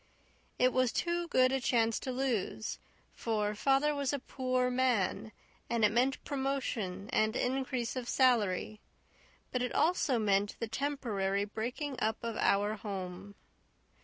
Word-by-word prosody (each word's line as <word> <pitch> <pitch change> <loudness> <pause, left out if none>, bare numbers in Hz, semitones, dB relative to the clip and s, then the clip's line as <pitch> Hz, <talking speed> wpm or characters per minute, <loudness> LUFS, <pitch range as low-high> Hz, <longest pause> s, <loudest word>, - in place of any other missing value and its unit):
It 250 0 +3
was 255 -2 +2
too 345 0 -1
good 255 -5 +4
a 270 - +1
chance 230 -2 +2
to 260 - -4
lose, 245 -5 -2 0.3
for 210 -2 -1
father 275 +6 +2
was 280 -2 -1
a 285 - 0
poor 255 -1 -1
man 245 -5 +1 0.4
and 235 -2 +3
it 210 - +3
meant 255 +4 +1
promotion 255 -9 -2
and 215 +1 +2
increase 255 -2 -1
of 250 -2 -4
salary; 215 -5 +2 0.7
but 250 - -1
it 250 - -2
also 310 -6 +2
meant 205 -2 +1
the 230 - -2
temporary 220 -7 -1
breaking 245 +7 -4
up 220 +1 0
of 230 -1 -3
our 205 +2 +2
home. 195 -1 -6
240 Hz, 140 wpm, -32 LUFS, 210-260 Hz, 0.7 s, good